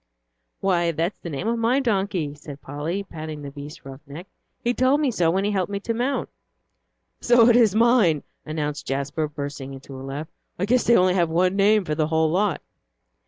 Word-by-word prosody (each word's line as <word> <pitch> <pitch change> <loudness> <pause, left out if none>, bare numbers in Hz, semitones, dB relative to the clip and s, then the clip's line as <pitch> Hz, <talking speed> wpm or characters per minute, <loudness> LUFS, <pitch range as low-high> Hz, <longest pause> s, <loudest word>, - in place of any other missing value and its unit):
"Why, 175 -3 +2
that's 165 +5 -2
the 170 - -7
name 150 +7 -4
of 235 0 0
my 235 +4 +2
donkey," 195 - -1
said 145 -1 -10
Polly, 155 +8 -3
patting 155 -5 -7
the 140 - -7
beast's 145 +3 -10
rough 135 0 -10
neck. 155 +6 -9 0.4
"He 240 - +1
told 260 +3 +3
me 290 -4 +1
so 175 -7 +2
when 190 +3 +1
he 205 - 0
helped 190 -1 -1
me 200 - -2
to 230 - -2
mount." 250 +4 -1 0.9
"So 240 -1 +5
it 235 - +5
is 225 -5 +4
mine," 220 - +4 0.2
announced 150 -2 -4
Jasper, 140 +3 -2
bursting 140 -2 -6
into 135 +1 -11
a 130 - -8
laugh. 140 +3 -5 0.3
"I 185 - 0
guess 245 +3 +2
they 235 - +5
only 180 0 +4
have 175 -3 +2
one 180 +3 +2
name 205 0 +4
for 155 - -1
the 155 0 0
whole 160 0 +2
lot." 190 -2 0
170 Hz, 205 wpm, -23 LUFS, 150-210 Hz, 0.9 s, So